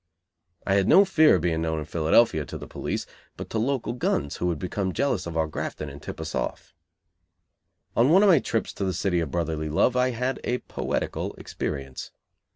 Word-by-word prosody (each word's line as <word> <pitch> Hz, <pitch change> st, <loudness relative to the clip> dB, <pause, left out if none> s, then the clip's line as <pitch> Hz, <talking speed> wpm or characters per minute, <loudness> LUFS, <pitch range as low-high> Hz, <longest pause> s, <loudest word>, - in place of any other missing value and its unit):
I 95 Hz, -, +1 dB
had 100 Hz, -1 st, +3 dB
no 195 Hz, +2 st, +7 dB
fear 160 Hz, -5 st, +5 dB
of -, -, 0 dB
being 80 Hz, -2 st, 0 dB
known 80 Hz, -1 st, -1 dB
in 75 Hz, -, -4 dB
Philadelphia 80 Hz, +2 st, +3 dB
to -, -, -7 dB
the -, -, -8 dB
police; -, -, -4 dB, 0.3 s
but -, -, -8 dB
to 110 Hz, -, 0 dB
local 125 Hz, 0 st, -1 dB
guns 70 Hz, -, -1 dB
who 90 Hz, -, -1 dB
would 85 Hz, -3 st, 0 dB
become 95 Hz, +3 st, -2 dB
jealous 135 Hz, -11 st, 0 dB
of 85 Hz, -1 st, -4 dB
our 80 Hz, -, +2 dB
grafting 75 Hz, -1 st, -5 dB
and 70 Hz, -, -11 dB
tip -, -, -7 dB
us -, -, -5 dB
off. -, -, -4 dB, 1.2 s
On 120 Hz, +4 st, +4 dB
one 190 Hz, +5 st, +6 dB
of 205 Hz, -, +6 dB
my 175 Hz, -, +7 dB
trips 115 Hz, -, -2 dB
to -, -, -4 dB
the 95 Hz, -1 st, 0 dB
City 90 Hz, -4 st, +1 dB
of 80 Hz, -3 st, -2 dB
Brotherly 80 Hz, 0 st, -2 dB
Love 100 Hz, +11 st, +2 dB
I 125 Hz, 0 st, +3 dB
had 125 Hz, +2 st, -2 dB
a 125 Hz, -, 0 dB
poetical -, -, -3 dB
experience. 70 Hz, -3 st, -5 dB
95 Hz, 205 wpm, -26 LUFS, 80-125 Hz, 1.2 s, no